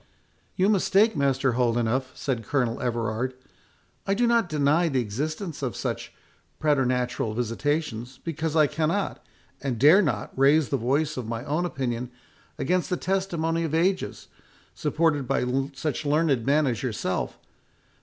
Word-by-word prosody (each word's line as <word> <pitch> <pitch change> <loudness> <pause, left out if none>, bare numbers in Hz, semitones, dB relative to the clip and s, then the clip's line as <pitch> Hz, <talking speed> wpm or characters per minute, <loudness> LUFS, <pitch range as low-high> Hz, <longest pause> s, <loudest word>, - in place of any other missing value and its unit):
"You 190 0 +3
mistake, 205 +1 +3
Master 135 -2 +2
Holdenough," 120 +1 +1
said 125 -5 -2
Colonel 125 -1 -1
Everard; 120 +1 -1 0.7
"I 195 - +2
do 240 +3 +2
not 235 -5 +2
deny 155 +3 +2
the 135 -3 +1
existence 150 - -3
of 130 -4 -2
such - - -4 0.5
preternatural 125 -6 0
visitations, 125 +1 -2
because 160 -1 -3
I 155 -2 +6
cannot, 165 +7 -1 0.4
and 135 -4 -2
dare 155 - +7
not, - - -1
raise 140 +2 +4
the 140 - +1
voice 140 +6 0
of 125 -3 -4
my 115 +2 -4
own 155 +5 0
opinion 125 -6 -3 0.5
against 180 +5 0
the 180 - 0
testimony 170 -4 -1
of 160 -1 -1
ages, 185 +3 0 0.5
supported 150 -5 0
by 135 -1 +1 0.3
such 150 +2 -2
learned 145 -5 +1
men 150 +2 +4
as 125 -4 -1
yourself. 105 -7 -2
140 Hz, 140 wpm, -26 LUFS, 125-165 Hz, 0.7 s, dare